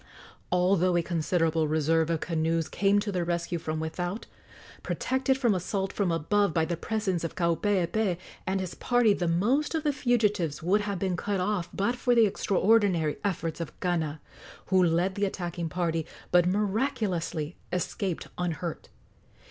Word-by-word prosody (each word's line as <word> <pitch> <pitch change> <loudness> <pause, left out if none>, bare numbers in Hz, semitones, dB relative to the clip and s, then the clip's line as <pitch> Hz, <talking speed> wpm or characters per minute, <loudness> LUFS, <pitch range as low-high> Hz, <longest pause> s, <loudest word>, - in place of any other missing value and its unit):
Although 180 0 +3
a 170 - +1
considerable 165 -1 +1
reserve 160 +1 +2
of 165 -2 0
canoes 165 -1 0
came 200 0 +2
to 205 0 -3
their 180 -2 -1
rescue 170 0 -2
from 155 -1 -3
without, 175 +6 -3 0.6
protected 265 0 0
from 240 -5 +2
assault 190 +1 -2
from 195 -4 0
above 170 +3 +1
by 160 -1 +3
the 170 - -2
presence 190 -1 -2
of 165 - -4
Kaupeepee 180 +2 +1 0.3
and 190 +1 0
his 185 -2 -4
party, 245 -4 +3
the 175 -3 -1
most 240 - +1
of 315 - -1
the 295 -2 +1
fugitives 210 - +1
would 195 +5 +3
have 200 -2 -2
been 185 0 -1
cut 200 +3 -2
off 185 -2 -1
but 220 +5 0
for 245 0 +2
the 230 -1 +6
extraordinary 195 -5 +2
efforts 170 -4 -2
of 165 - -7
Kana, 160 -4 -1 0.5
who 185 -1 +6
led 175 +3 +2
the 200 +1 0
attacking 175 -3 -3
party, 165 -2 -1 0.2
but 175 0 +5
miraculously 190 - -1 0.2
escaped 180 0 -2
unhurt. 170 -1 -3
180 Hz, 155 wpm, -28 LUFS, 165-205 Hz, 0.6 s, the